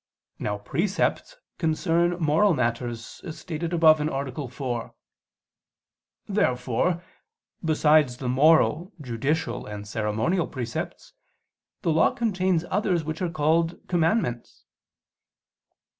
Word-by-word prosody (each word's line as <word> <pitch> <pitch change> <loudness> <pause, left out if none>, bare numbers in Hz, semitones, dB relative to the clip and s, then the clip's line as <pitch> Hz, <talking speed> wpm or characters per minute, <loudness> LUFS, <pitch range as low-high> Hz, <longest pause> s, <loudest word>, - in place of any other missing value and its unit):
Now 105 0 -2
precepts 180 - -1 0.2
concern 170 +1 +1
moral 165 +4 +3
matters, 120 -2 -3
as 165 -4 -7
stated 165 -1 -4
above 160 -3 +5
(A. 140 -2 -3
4). 125 -2 -5 1.3
Therefore 165 - 0 0.6
besides 155 -5 +3
the 130 - -5
moral, 155 - +3
judicial 130 +1 -2
and 105 -1 -7
ceremonial 110 - 0
precepts, 120 -3 -5 0.7
the 165 - +2
Law 160 - +4
contains 185 -6 +1
others 185 -4 +1
which 155 +2 -5
are 180 - 0
called 165 +1 +1
"commandments." 165 - 0
155 Hz, 100 wpm, -25 LUFS, 125-170 Hz, 1.3 s, above